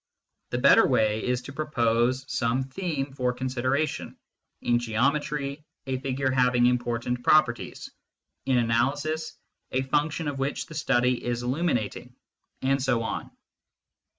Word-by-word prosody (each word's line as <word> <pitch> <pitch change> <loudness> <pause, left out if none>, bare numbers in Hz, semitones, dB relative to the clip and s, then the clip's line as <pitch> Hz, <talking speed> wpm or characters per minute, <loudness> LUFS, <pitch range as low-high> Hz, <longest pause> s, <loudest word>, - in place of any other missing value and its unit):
The 120 - -2
better 140 +3 +6
way 110 -4 +2
is 125 0 -1
to 140 - -9
propose 125 -3 +1
some 125 +1 0
theme 140 -1 -3
for 125 -2 0
consideration 130 +4 -2 0.5
in 120 0 +3
geometry, 140 +5 -1 0.2
a 130 -1 -2
figure 135 0 -1
having 125 -1 +3
important 120 0 0
properties; 125 -4 +2 0.6
in 130 -2 +3
analysis, 140 +7 0 0.3
a 130 +1 0
function 150 +3 0
of 140 -2 -3
which 135 +2 -2
the - - -12
study 125 -4 +1
is 120 0 -2
illuminating, 125 - -2 0.5
and 135 +1 +2
so 130 -3 +1
on. - - -4
130 Hz, 125 wpm, -26 LUFS, 120-140 Hz, 0.6 s, better